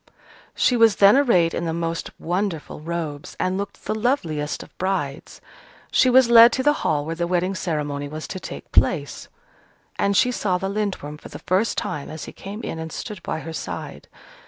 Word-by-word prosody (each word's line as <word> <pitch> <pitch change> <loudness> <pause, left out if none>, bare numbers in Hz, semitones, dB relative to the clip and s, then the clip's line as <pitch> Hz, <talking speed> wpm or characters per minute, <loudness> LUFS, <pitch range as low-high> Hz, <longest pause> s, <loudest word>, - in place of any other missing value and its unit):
She 250 - +3
was 230 -3 +5
then 200 +3 +7
arrayed 210 -12 +3
in 170 - -2
the 165 -1 -2
most 165 0 -3
wonderful 175 -4 -3
robes, 160 -3 -5
and 185 0 0
looked 200 +1 -6
the - - -1
loveliest 175 - -1
of - - -18
brides. 180 -7 -3 0.5
She 255 - +4
was 255 0 +6
led 235 0 +9
to 260 - 0
the 295 +1 +4
hall 145 -2 0
where 165 - -3
the 170 +1 -2
wedding 180 +2 0
ceremony 145 -6 -3
was 155 +2 -7
to 185 - -5
take - - -9
place, - - +1 0.7
and 200 -1 +2
she 250 - +4
saw 195 -6 0
the 195 +1 -3
Lindworm 195 -8 -3
for - - -11
the - - -8
first 195 +5 +1
time 145 - -3
as 155 -1 -7
he - - -8
came 205 +4 -8
in 165 - -4
and 160 0 -6
stood 205 -4 -6
by 160 - -4
her 165 - -7
side. - - -6
180 Hz, 195 wpm, -23 LUFS, 160-210 Hz, 0.7 s, led